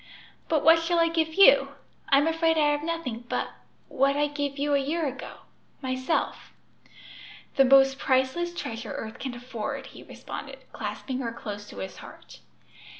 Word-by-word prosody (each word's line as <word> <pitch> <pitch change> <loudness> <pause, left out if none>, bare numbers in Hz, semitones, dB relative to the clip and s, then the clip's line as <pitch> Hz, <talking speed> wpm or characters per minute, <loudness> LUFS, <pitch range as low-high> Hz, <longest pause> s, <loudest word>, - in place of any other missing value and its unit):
"But 310 -3 +2
what 330 +1 +7
shall 335 +1 0
I 330 0 +4
give 320 -1 0
you? 395 +6 +6 0.4
I'm 275 +2 +5
afraid 325 0 +2
I 295 -1 +4
have 290 0 -1
nothing 300 -8 -4
but - - -1 0.4
what 275 +2 +1
I 295 - +3
gave 285 -1 -3
you 290 +1 0
a 280 - +4
year 310 +4 -1
ago 270 -1 -6 0.4
myself." 260 +4 -2 1.0
"The 270 - +6
most 270 +1 +5
priceless 265 +7 +1
treasure 230 -9 -6
earth 220 0 -7
can 260 -2 -5
afford!" 240 -3 -5
he - - -11
responded, - - -8 0.2
clasping 260 -1 -4
her 235 -3 -3
close 205 -3 -7
to - - -11
his 95 -1 -6
heart. - - -13
280 Hz, 160 wpm, -27 LUFS, 255-325 Hz, 1.0 s, what